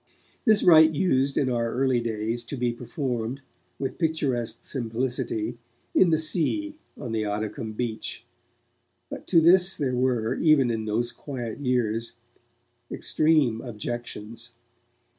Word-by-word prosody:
This 215 -3 +4
rite 160 -2 +7
used, 140 -5 +1
in 135 - +2
our 120 -2 0
earliest 130 -2 +1
days, 115 +1 -2
to 140 - -6
be 120 -1 0
performed, 125 0 -4 0.4
with 135 - -4
picturesque 145 -8 -1
simplicity, 120 -2 -3 0.3
in 185 - +5
the 160 - +3
sea 240 - -1 0.2
on 125 -5 -6
the 110 -1 0
Oddicombe 105 +1 -3
beach, 115 -3 -4 0.9
but - - -7
to 165 - +5
this 180 +3 +5
there 135 -4 -1
were, 125 -3 +1
even 145 -6 +4
in 110 -1 -2
those 115 +3 -1
quiet 125 -5 -6
years, 120 -4 -1 0.8
extreme 150 -8 +2
objections. 115 -1 -6
125 Hz, 125 wpm, -26 LUFS, 115-150 Hz, 0.9 s, rite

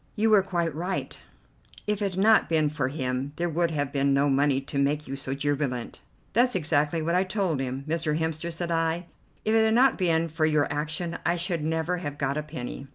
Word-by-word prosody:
"You 220 +1 +2
were 210 -2 +7
quite 170 -4 -1
right; 180 +5 -3 0.7
if 210 0 -1
it 200 -2 0
had - - -2
not 220 0 +5
been 155 -2 +2
for 145 -3 -1
him 130 0 -3
there 175 0 -1
would 170 +2 +1
have 145 -3 -2
been 140 -1 +2
no 140 +1 +3
money 140 0 +3
to 140 +1 -4
make 145 +2 0
you 135 - -4
so 135 0 -3
jubilant." 140 -3 -2 0.3
"That's 245 +2 +3
exactly 155 -1 +1
what 170 +2 0
I 180 +1 +3
told 185 -6 -1
him. 135 +1 -4
'Mr. 155 -1 0
Hemster' 160 +1 -2
said 170 +1 -3
I, 165 +1 0 0.4
'if 215 - +2
it 225 0 +5
had 220 0 +3
not 260 0 +4
been 165 -2 +2
for 160 0 0
your 150 -2 +3
action 155 +3 -3
I 170 - +2
should 170 -2 -1
never 160 +3 -1
have 145 -5 -5
got 140 -1 -1
a 150 - -1
penny. 140 -2 -7
160 Hz, 220 wpm, -26 LUFS, 145-175 Hz, 0.7 s, were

